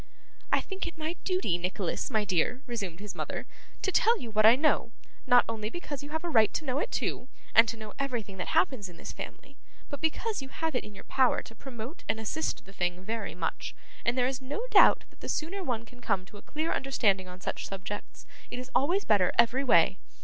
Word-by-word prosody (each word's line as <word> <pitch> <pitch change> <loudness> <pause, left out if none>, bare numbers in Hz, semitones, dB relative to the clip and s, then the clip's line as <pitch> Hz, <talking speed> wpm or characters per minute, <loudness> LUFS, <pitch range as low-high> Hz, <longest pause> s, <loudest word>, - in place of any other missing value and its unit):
'I - - +4
think 385 -2 -4
it 335 - -8
my 320 +2 -2
duty, 365 - +1
Nicholas, 180 0 -2
my 215 -4 +1
dear,' 205 - +1
resumed 200 -9 -4
his 205 0 -6
mother, - - -4 0.4
'to 385 - +2
tell 460 +5 +4
you 230 - -6
what 215 0 +6
I 230 - +9
know: 285 -4 +2 0.4
not 245 -1 +7
only 215 -2 -3
because 290 -2 -5
you 285 - -8
have 320 +2 -3
a 345 - -2
right 220 -8 +5
to 315 - -1
know 265 0 0
it 475 - -1
too, 250 - -2 0.3
and 230 +1 +8
to 230 - -3
know 215 -1 -8
everything 235 -8 -2
that 180 - -3
happens 205 0 +1
in 175 - -13
this - - -6
family, - - -9 0.3
but 285 - -5
because 380 +5 0
you 270 - -7
have 320 +2 -2
it 250 - 0
in 210 - -11
your 190 - -10
power 260 -2 +3
to - - -12
promote 255 - -8
and 220 +1 +1
assist 290 +9 -2
the 195 - -14
thing 180 -1 -1
very 220 0 -3
much; 165 -2 -3 0.3
and 235 +2 +1
there 250 - +4
is 265 +1 -1
no 285 - -4
doubt - - +7
that - - -25
the - - -7
sooner 360 +5 -2
one 230 -6 -2
can 245 +2 -16
come 200 -5 0
to 205 - -13
a - - -12
clear 310 +2 -2
understanding 205 -9 +1
on 180 0 -10
such - - -4
subjects, 195 +1 -6 0.2
it - - -5
is 255 +1 -7
always 355 +9 +2
better, 200 -4 +4
every 235 +3 +4
way. 190 -6 +5
235 Hz, 230 wpm, -30 LUFS, 205-285 Hz, 0.4 s, I